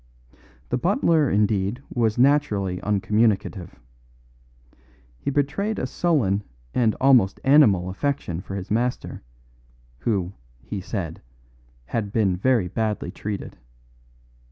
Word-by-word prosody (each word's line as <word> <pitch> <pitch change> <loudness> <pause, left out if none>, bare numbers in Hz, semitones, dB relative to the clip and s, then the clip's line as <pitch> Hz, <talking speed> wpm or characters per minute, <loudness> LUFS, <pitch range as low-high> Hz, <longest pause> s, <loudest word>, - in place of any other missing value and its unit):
The 125 - 0
butler 165 - +2
indeed 105 +4 0
was 115 -2 +1
naturally 120 -9 +2
uncommunicative. 105 - 0 1.4
He - - -3
betrayed 145 +10 -1
a - - -1
sullen 130 - +1 0.3
and 115 -3 +2
almost 125 -8 +4
animal 130 -11 +5
affection 95 - -2
for 95 - -7
his 95 0 -6
master; 120 +3 -1 0.8
who, 100 -5 -1 0.3
he 65 +10 -5
said, 90 -5 -5 0.6
had 105 - -3
been 100 -4 +2
very 115 0 +2
badly 105 +3 -2
treated. 105 -2 -6
110 Hz, 105 wpm, -24 LUFS, 95-130 Hz, 1.4 s, animal